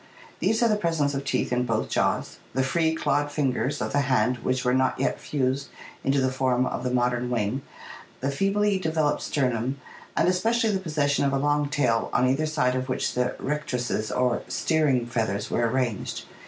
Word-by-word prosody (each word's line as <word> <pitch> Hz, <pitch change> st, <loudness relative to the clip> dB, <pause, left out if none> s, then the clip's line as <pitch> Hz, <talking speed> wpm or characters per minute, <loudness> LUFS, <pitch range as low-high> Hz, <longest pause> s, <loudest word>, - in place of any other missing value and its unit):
These 220 Hz, +2 st, +2 dB
are -, -, +5 dB
the 210 Hz, -2 st, +2 dB
presence 165 Hz, -6 st, 0 dB
of 135 Hz, 0 st, -2 dB
teeth 135 Hz, -2 st, -1 dB
in 125 Hz, 0 st, +2 dB
both 115 Hz, -3 st, -1 dB
jaws, -, -, -1 dB, 0.2 s
the 130 Hz, -, +2 dB
free, 160 Hz, +4 st, +1 dB
clawed 145 Hz, -2 st, 0 dB
fingers 140 Hz, 0 st, 0 dB
of -, -, -3 dB
the 145 Hz, -, +2 dB
hand 125 Hz, -3 st, +2 dB
which 130 Hz, +1 st, -1 dB
were 125 Hz, -, +3 dB
not 130 Hz, 0 st, +1 dB
yet 135 Hz, -, 0 dB
fused 135 Hz, -1 st, -1 dB, 0.4 s
into 140 Hz, +1 st, +2 dB
the 130 Hz, -1 st, +1 dB
form 130 Hz, -1 st, +1 dB
of 125 Hz, -, -3 dB
the 125 Hz, -, 0 dB
modern 125 Hz, 0 st, 0 dB
wing, 120 Hz, +2 st, -1 dB, 0.6 s
the 135 Hz, +2 st, -1 dB
feebly 195 Hz, +5 st, +1 dB
developed 160 Hz, -4 st, 0 dB
sternum, 130 Hz, -1 st, -1 dB, 0.4 s
and -, -, +3 dB
especially 225 Hz, +5 st, +2 dB
the 195 Hz, -, 0 dB
possession 150 Hz, -6 st, 0 dB
of 140 Hz, -1 st, +1 dB
a -, -, +2 dB
long 145 Hz, +1 st, +1 dB
tail 130 Hz, -6 st, +1 dB
on 125 Hz, -, +3 dB
either 140 Hz, +5 st, +1 dB
side 145 Hz, -5 st, +1 dB
of 130 Hz, 0 st, -2 dB
which 130 Hz, -, -1 dB
the 125 Hz, 0 st, 0 dB
rectrices 125 Hz, -7 st, -2 dB
or 125 Hz, -1 st, +1 dB
steering 150 Hz, -7 st, +1 dB
feathers 110 Hz, -4 st, -2 dB
were 120 Hz, 0 st, +2 dB
arranged. 120 Hz, -5 st, -2 dB
135 Hz, 190 wpm, -26 LUFS, 125-150 Hz, 0.6 s, are